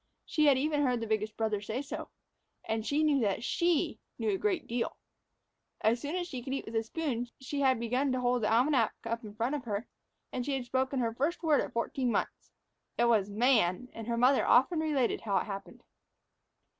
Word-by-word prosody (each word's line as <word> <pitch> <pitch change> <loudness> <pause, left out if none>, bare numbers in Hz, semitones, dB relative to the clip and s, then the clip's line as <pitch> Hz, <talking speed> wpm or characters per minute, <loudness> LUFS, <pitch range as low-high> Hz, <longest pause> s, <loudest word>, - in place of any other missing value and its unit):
She 305 -2 +2
had 275 -2 +6
even 295 +2 +1
heard 250 -4 +2
the 225 - -3
biggest 215 -1 -1
brother 220 -2 0
say 225 +6 -3
so. 280 - -6 0.6
And 220 0 -1
she 290 +6 +1
knew 295 -3 +3
that 210 -1 0
she 340 +3 +1 0.2
knew 425 - 0
a 390 - 0
great 380 -6 0
deal. 235 0 -2 0.8
As 230 +2 +2
soon 295 +4 -3
as 355 -1 -2
she 260 -7 -5
could 265 +2 -3
eat - - -4
with 225 - -7
a 225 - +3
spoon, 245 0 -3
she 275 +2 -4
had 260 -3 +3
begun 250 +4 0
to 255 - 0
hold 245 -1 +1
the 215 - +1
almanac 245 0 +3
up 230 +1 -3
in 210 -1 -9
front 230 +5 -1
of 285 -4 -3
her; 210 +1 -2 0.5
and 250 - -1
she 275 +1 -1
had 260 -2 -3
spoken 260 +2 0
her 230 -1 0
first 300 +9 -1
word 310 -3 +4
at - - -4
fourteen 245 +2 -1
months. - - -2 0.5
It 240 - +3
was 215 -4 +3
"Man," 220 -1 +2
and 225 -1 -7
her 235 -1 -1
mother 255 +3 +4
often 290 +7 +4
related 295 -6 +1
how 200 -3 0
it - - +1
happened. 195 -1 -8
250 Hz, 215 wpm, -31 LUFS, 225-285 Hz, 0.8 s, had